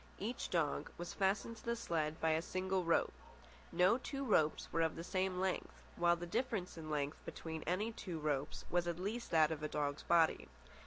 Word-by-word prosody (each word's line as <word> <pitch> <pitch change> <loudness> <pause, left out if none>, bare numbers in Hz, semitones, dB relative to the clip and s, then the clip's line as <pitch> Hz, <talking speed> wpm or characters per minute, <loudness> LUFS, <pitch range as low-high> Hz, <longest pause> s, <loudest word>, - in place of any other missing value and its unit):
Each 230 +5 -3
dog 165 -5 0
was 175 0 -5
fastened 200 +4 0
to - - -14
the 235 0 0
sled 160 -8 -1
by 160 - +2
a 160 +1 +2
single 185 +1 -1
rope. 165 0 +2 0.6
No 185 +7 +4
two 275 +1 -4
ropes 155 -10 +3
were 165 - +2
of 160 -1 +1
the 165 - -5
same 185 0 0
length, 190 0 -2
while 175 0 +4
the 175 0 -5
difference 205 0 -1
in 160 -2 -7
length 145 0 -2
between 160 -1 -5
any 200 +6 +1
two 185 -6 -5
ropes 150 -1 -2
was 175 0 +2
at 170 -1 -1
least 215 +6 -3
that 160 -1 +5
of 155 -1 -3
a 150 - -1
dog's 145 -1 -1
body. 165 -2 +3
175 Hz, 200 wpm, -37 LUFS, 160-190 Hz, 0.6 s, that